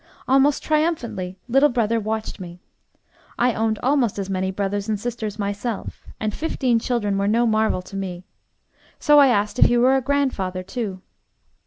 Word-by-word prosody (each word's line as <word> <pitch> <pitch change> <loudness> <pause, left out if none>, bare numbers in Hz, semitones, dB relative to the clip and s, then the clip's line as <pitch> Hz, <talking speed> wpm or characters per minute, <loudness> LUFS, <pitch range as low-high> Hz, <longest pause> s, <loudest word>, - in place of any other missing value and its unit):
Almost 275 +2 +3
triumphantly, 300 - -1
little 270 +4 +4
brother 230 -2 +1
watched 220 0 -4
me. 175 -1 -9 0.8
I 245 0 +2
owned 220 0 0
almost 255 -5 +1
as 195 -1 -4
many 190 0 -1
brothers 200 +2 -2
and 210 -2 -1
sisters 220 -2 -4
myself, 205 +2 -4
and 215 -1 -2
fifteen 255 -6 0
children 210 -5 -1
were 200 - 0
no 230 +3 +2
marvel 220 -4 +1
to 190 - -11
me. 185 -2 -5 0.7
So 295 -1 +5
I 280 - +7
asked 210 0 0
if - - +7
he 240 - +3
were 255 +2 +4
a 265 - +2
grandfather 250 -10 -1
too. 195 -1 -5
220 Hz, 165 wpm, -22 LUFS, 195-250 Hz, 0.8 s, I